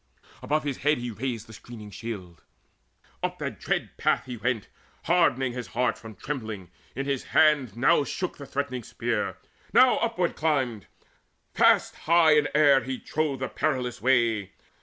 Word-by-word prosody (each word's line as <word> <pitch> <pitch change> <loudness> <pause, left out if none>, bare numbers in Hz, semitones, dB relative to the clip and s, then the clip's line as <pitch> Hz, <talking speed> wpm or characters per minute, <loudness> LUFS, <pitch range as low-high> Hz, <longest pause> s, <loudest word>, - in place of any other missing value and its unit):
Above 155 +1 0
his 140 -3 -3
head 150 +2 +2
he 120 0 -4
raised 115 0 -4
The 110 - -13
screening 110 -1 -11
shield; 95 -5 -7 0.8
up - - -2
that - - -5
dread - - -2
path - - +1
he 125 -1 -6
went 120 -1 -2 0.4
Hardening 135 -7 +2
his 125 -2 -5
heart 125 0 +2
from 110 -2 -11
trembling, 110 - -6 0.2
in 135 +2 -3
his 140 -2 -2
hand 145 -8 +4
Now 145 +5 +4
shook 180 +5 -4
the 140 - -9
threatening 135 -2 -3
spear, 115 -1 -2 0.4
now 255 0 +6
upward 225 -7 0
climbed 130 - -1 0.7
Fast - - +4
high 165 -1 +4
in 150 -1 +3
air 145 -3 +6
he 130 +1 -4
trod 150 -3 -2
the 130 - -1
perilous 125 -4 -2
way. 115 -5 +2
130 Hz, 160 wpm, -26 LUFS, 115-150 Hz, 0.8 s, now